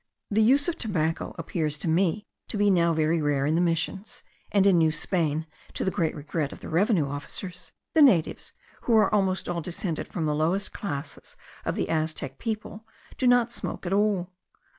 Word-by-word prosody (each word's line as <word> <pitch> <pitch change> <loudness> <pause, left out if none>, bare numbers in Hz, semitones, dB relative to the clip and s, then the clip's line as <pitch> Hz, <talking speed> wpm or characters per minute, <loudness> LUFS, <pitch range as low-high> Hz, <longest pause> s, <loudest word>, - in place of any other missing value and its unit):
The 215 +2 +3
use 270 +6 +4
of 345 0 -2
tobacco 165 -8 -1
appears 155 -4 -2
to 160 - -5
me 180 +5 +1 0.2
to - - -4
be 205 0 +4
now 170 -2 +3
very 160 +1 +1
rare 145 -2 +1
in 150 - +1
the 165 - +2
missions; 180 +4 -2 0.3
and 200 -1 +4
in 190 -4 +5
New 160 -1 +4
Spain, 160 -1 -1 0.3
to - - -1
the 190 - +1
great 170 -5 -1
regret 150 0 -3
of - - -10
the - - -8
revenue 175 - +2
officers, 175 +6 -7 0.2
the 320 - +5
natives, 210 - +3 0.3
who 235 - +3
are 215 - +3
almost 190 -2 +1
all 175 -1 -2
descended 170 0 -4
from 165 - -3
the 150 - +1
lowest 170 +7 0
class 145 -7 -6 0.3
of - - -1
the - - -1
Aztec 155 -4 -2
people, 220 -1 -4 0.4
do 255 - +2
not 245 -1 +4
smoke - - -5
at 180 - -1
all. 200 -3 +1
175 Hz, 190 wpm, -26 LUFS, 155-205 Hz, 0.4 s, in